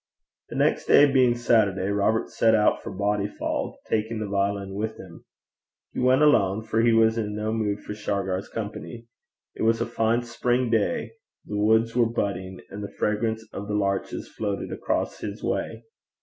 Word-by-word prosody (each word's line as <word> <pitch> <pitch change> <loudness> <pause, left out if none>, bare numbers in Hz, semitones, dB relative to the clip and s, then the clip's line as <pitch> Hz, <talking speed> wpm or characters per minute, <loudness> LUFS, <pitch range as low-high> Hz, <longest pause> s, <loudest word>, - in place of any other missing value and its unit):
The - - -7
next - - +1
day 145 - +7
being 130 -4 +3
Saturday, 105 -5 +2
Robert 105 +2 +1
set 110 -1 +3
out 105 -1 +3
for - - -7
Bodyfauld, 100 +1 -2
taking 110 +1 -1
the 110 - -3
violin 100 -1 -1
with 110 +2 -3
him. 85 -3 -12 0.7
He - - -4
went 130 +3 +4
alone, 110 -8 +3
for 110 0 0
he 115 0 +4
was 115 0 +4
in 105 -1 -3
no 110 +1 -2
mood 105 -2 -1
for - - -6
Shargar's 100 -2 -2
company. 110 +2 -6 0.5
It - - -8
was 115 0 +3
a 115 - 0
fine 115 0 0
spring 120 +1 0
day, 110 -3 0 0.3
the 105 - -5
woods 110 +2 +3
were 120 -2 +3
budding, 95 -5 -3
and 100 +1 -6
the 100 - -6
fragrance 110 +1 -1
of 100 - -6
the 105 - -2
larches 100 -1 -1
floated 100 -2 -4
across - - -2
his - - -6
way. 115 +1 -2
110 Hz, 175 wpm, -25 LUFS, 100-115 Hz, 0.7 s, day